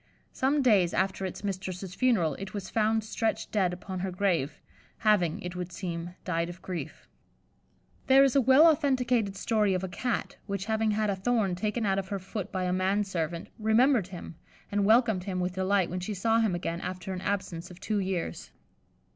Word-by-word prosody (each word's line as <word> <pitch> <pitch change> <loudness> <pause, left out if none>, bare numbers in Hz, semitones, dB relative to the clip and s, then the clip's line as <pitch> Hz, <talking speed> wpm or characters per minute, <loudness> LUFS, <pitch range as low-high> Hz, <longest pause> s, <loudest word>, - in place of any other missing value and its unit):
Some 275 +2 +1
days 195 -8 +4
after 190 0 0
its 185 - -8
mistress's 190 -2 -4
funeral, 205 - +2
it 195 +1 -7
was 195 -2 -5
found 220 0 +2
stretched 220 +1 -2
dead 190 -4 +2
upon 185 +1 -6
her 190 +1 -2
grave, 175 -6 0 0.4
having, 205 -7 +2
it 180 0 -5
would 180 0 -5
seem, 175 -1 -5
died 170 -1 -1
of 175 +1 -9
grief. 180 -2 -6 1.0
There 270 +1 +7
is 275 -1 +2
a 275 - +6
well 265 +5 +7
authenticated 255 -9 +2
story 210 -1 +1
of 185 - -2
a - - -1
Cat 230 +6 -3
which 200 -1 -3
having 220 0 +1
had 215 0 +1
a - - -1
thorn 200 -1 +1
taken 215 +5 -1
out 195 -1 +2
of 190 - -5
her 200 - -2
foot 190 +1 -6
by 185 -2 -2
a 180 0 0
man 190 +3 +1
servant, 170 -3 -3
remembered 220 0 +3
him, 180 -2 -8 0.4
and 205 0 +1
welcomed 220 -4 +4
him 185 -2 -2
with 180 0 -1
delight 190 -1 +1
when 180 - -2
she 200 +3 -4
saw 225 +4 +2
him 215 -6 +2
again 170 0 -3
after 185 +1 -5
an 180 - -5
absence 190 -3 -3
of 180 0 -12
two 210 +1 -1
years. 185 - -3
195 Hz, 195 wpm, -29 LUFS, 180-220 Hz, 1.0 s, There